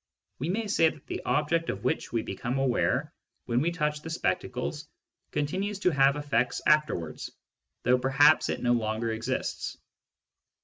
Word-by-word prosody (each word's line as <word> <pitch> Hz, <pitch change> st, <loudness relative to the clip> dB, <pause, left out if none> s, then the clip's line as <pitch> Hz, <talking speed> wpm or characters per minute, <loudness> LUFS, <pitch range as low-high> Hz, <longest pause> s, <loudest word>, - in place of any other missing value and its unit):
We 150 Hz, +6 st, -2 dB
may 220 Hz, +5 st, -1 dB
say 165 Hz, -6 st, +3 dB
that 150 Hz, -3 st, -13 dB
the -, -, -4 dB
object 165 Hz, +3 st, +1 dB
of 100 Hz, +1 st, -4 dB
which 125 Hz, -, -1 dB
we 115 Hz, -2 st, 0 dB
become 120 Hz, +7 st, -3 dB
aware 135 Hz, -2 st, +1 dB, 0.3 s
when 120 Hz, +1 st, +1 dB
we 165 Hz, -, +2 dB
touch 150 Hz, -3 st, -1 dB
the 160 Hz, -, -7 dB
spectacles 150 Hz, -1 st, -2 dB, 0.4 s
continues 190 Hz, +8 st, -1 dB
to 180 Hz, -, +3 dB
have 140 Hz, -1 st, +4 dB
effects 140 Hz, -5 st, 0 dB
afterwards, 150 Hz, -, +1 dB, 0.5 s
though 125 Hz, +1 st, +4 dB
perhaps 135 Hz, +4 st, +4 dB
it -, -, -2 dB
no 120 Hz, 0 st, +3 dB
longer 110 Hz, 0 st, -1 dB
exists. 115 Hz, +4 st, -3 dB
140 Hz, 150 wpm, -28 LUFS, 120-155 Hz, 0.5 s, have